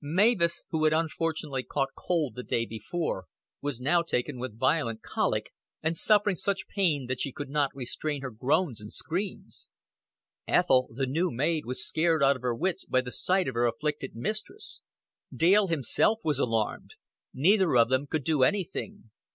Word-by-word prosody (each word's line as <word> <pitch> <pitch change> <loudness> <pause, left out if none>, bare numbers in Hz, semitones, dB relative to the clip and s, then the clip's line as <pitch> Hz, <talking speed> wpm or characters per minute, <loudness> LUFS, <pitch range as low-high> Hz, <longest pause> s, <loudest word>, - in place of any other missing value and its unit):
Mavis, 170 +1 +2
who 155 -1 +1
had 155 - +4
unfortunately 160 -3 -1
caught 135 +1 -2
cold 160 -9 -1
the 125 - -6
day 115 -1 -1
before, 110 - -4 0.3
was 140 -4 -3
now 155 +7 +3
taken 130 -4 -2
with 120 -3 -6
violent 120 -3 0
colic, - - -1 0.3
and 160 +1 0
suffering 205 +1 +4
such 195 +2 -2
pain 165 -9 0
that 125 0 -2
she 140 - -1
could 140 +1 -7
not 145 -2 +2
restrain 140 +3 -3
her 130 - -4
groans 130 - 0
and 105 - -9
screams. 190 +5 -4 0.8
Ethel, 130 -8 +3
the 135 +4 -2
new 165 +8 0
maid, 150 +3 -1
was 130 +9 0
scared 160 -2 +2
out 140 0 +5
of 130 - -10
her 125 -2 -1
wits 185 +7 -2
by 130 - +1
the 125 -1 -7
sight 185 +4 +1
of 130 - -2
her 120 +1 +2
afflicted 135 +3 -3
mistress; 215 - -5 0.5
Dale 195 +5 +4
himself 170 - +2
was 150 -2 0
alarmed; 115 -3 -1 0.4
neither 180 +2 +3
of 115 0 +5
them 130 +2 +1
could 155 0 -2
do 155 -1 +1
anything. 200 - -1
150 Hz, 170 wpm, -28 LUFS, 125-170 Hz, 0.8 s, out